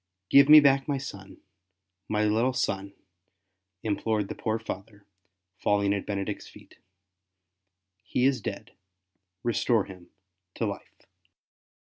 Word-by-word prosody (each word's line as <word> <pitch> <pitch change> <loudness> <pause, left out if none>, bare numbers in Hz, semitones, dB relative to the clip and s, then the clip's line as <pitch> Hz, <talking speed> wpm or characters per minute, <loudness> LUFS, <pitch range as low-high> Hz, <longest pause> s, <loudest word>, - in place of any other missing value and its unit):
'' 95 0 -58
Give 140 +1 +7
me 155 0 +11
back 135 -2 +3
my 145 -2 0
son, 100 -8 -9 0.7
my 105 0 +1
little 115 +5 +2
son/' 100 -5 -2 0.9
implored 105 -1 -1
the - - -3
poor 110 0 -2
father, 105 -1 -8 0.5
falling 100 -1 +2
at 100 - -4
Benedict's 100 0 -4
feet; - - -17 1.2
''he 125 - 0
is 135 -3 +2
dead, - - -6 0.7
restore 120 -2 +1
him 90 -3 -13 0.5
to - - -1
life." - - -8
105 Hz, 120 wpm, -27 LUFS, 100-125 Hz, 1.2 s, me